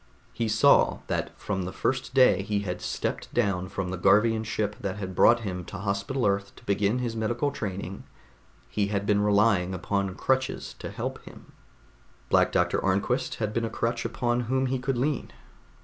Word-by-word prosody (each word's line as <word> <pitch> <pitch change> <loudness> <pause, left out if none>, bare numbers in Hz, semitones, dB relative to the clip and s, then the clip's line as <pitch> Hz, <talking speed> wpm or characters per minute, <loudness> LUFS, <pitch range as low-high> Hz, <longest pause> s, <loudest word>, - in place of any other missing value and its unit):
He 115 - -1
saw 110 0 +4
that - - -2
from 95 -2 -2
the 95 - -4
first 130 +2 -2
day 130 -6 +6
he 100 0 -1
had 90 -3 -4
stepped - - -3
down 95 -6 +1
from 95 -2 -3
the 95 - -3
Garvian 105 +4 +4
ship 105 -2 -2
that 95 -2 -3
had 95 -2 -5
brought 120 +6 +5
him 90 -4 -4
to 100 - -7
Hospital 100 +6 -1
Earth 100 0 0
to - - -16
begin 100 +3 +1
his 120 -2 -2
medical 120 +6 0
training, 100 -5 -5 0.6
he 105 -1 -1
had 100 -1 -1
been 105 0 +3
relying 100 -3 +3
upon 95 +1 -2
crutches 130 +5 -1
to - - -6
help - - -5
him. - - -13 0.8
Black - - +4
Doctor - - +1
Arnquist 100 +7 0
had 110 -1 -2
been 115 - 0
a - - -3
crutch 115 +1 -2
upon 120 0 0
whom 130 0 +2
he 130 0 -1
could 135 0 -1
lean. 140 +3 -1
105 Hz, 180 wpm, -27 LUFS, 100-120 Hz, 0.8 s, day